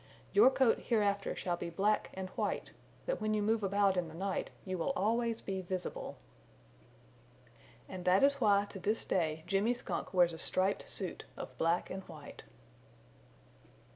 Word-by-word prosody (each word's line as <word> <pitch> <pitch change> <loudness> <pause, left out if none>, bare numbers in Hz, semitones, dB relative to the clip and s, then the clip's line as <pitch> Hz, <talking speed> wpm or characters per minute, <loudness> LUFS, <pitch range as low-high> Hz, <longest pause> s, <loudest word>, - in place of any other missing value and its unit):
Your 405 - +8
coat 265 -3 +3
hereafter 205 -4 +1
shall 175 -1 -2
be 170 - -4
black 200 +5 +1
and 190 0 -4
white, - - -2 0.3
that - - -2
when 215 0 +1
you 210 - +1
move 220 +1 +2
about 200 0 +2
in 175 -2 0
the 160 - -10
night 190 +2 -2 0.2
you 185 -1 -2
will 275 - 0
always 230 +2 +1
be 190 -1 -3
visible." 185 0 -4 1.7
And 185 -1 -7
this 195 +11 +5
is 280 - -13
why 200 -3 +5
that 205 - -8
to 195 - -7
this 210 +5 +1
day 160 -3 0
Jimmy 200 +6 +2
Skunk 185 -7 -4
wears 175 -2 +4
a 165 - -7
striped 190 +2 0
suit - - -4
of - - -7
black 170 +2 +1
and 190 - -4
white. - - -10
195 Hz, 170 wpm, -33 LUFS, 180-215 Hz, 1.7 s, Your